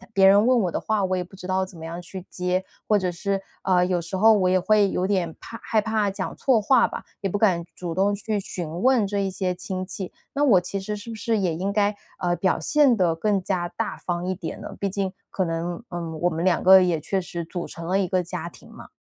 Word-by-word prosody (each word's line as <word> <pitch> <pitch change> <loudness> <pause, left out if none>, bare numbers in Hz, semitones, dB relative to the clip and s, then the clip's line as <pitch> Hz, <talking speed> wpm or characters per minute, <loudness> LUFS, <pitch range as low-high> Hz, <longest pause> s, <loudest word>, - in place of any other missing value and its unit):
别 195 -1 +6
人 200 +3 +6
问 250 -3 +4
我 180 - 0
的 - - -1
话， 210 -3 0
我 185 - 0
也 180 - -1
不 180 +2 -15
知 185 - -10
道 190 0 +1
怎 185 -2 -14
么 160 - -8
样 165 - -6
去 185 +1 -9
接， 180 +1 -1 0.2
或 210 - +4
者 185 -2 -1
是， 195 +3 -2 0.2
啊， 180 -1 +3
有 180 -1 +1
时 170 +3 -6
候 220 +3 +6
我 190 -4 +3
也 185 - +4
会 205 +1 +3
有 180 - 0
点 185 -5 0
怕 230 - -9
害 215 -1 +2
怕 215 -2 0
讲 195 - -4
错 255 -4 +3
话 240 +3 +4
吧， - - -7 0.2
也 195 - -1
不 205 - -1
敢 185 -5 +2
主 175 -2 -4
动 195 +3 +2
去 210 0 -2
询 175 -2 -5
问 250 -5 +4
这 200 +1 -2
一 195 -1 0
些 185 -1 -2
亲 185 +1 -5
戚。 185 0 -6 0.2
那 285 +1 +1
我 205 -10 +5
其 195 +2 -4
实 210 +2 -4
是 220 +3 -9
不 225 - -5
是 230 0 0
也 185 -5 0
应 190 +4 -2
该， 205 0 +2 0.3
呃， 175 -1 +1
表 185 -2 +1
现 280 - +4
得 180 -5 +2
更 200 +2 +1
加 180 -2 -1
大 - - -4
方 175 0 -3
一 185 - 0
点 170 -3 -6
呢？ - - -7
毕 200 - -1
竟 195 0 -2 0.2
可 190 - -1
能， 170 +4 -3
嗯， 170 -2 -5
我 175 - +3
们 165 +1 -3
2 180 -3 +2
个 190 0 +9
也 175 -2 +2
确 195 +5 -1
实 175 -2 -5
组 175 +1 -5
成 170 - -8
了 185 +3 +1
一 190 - +1
个 180 +1 +1
家 170 -1 -5
庭 175 - -14
嘛。 - - -12
190 Hz, 280 characters per minute, -24 LUFS, 175-205 Hz, 0.3 s, 个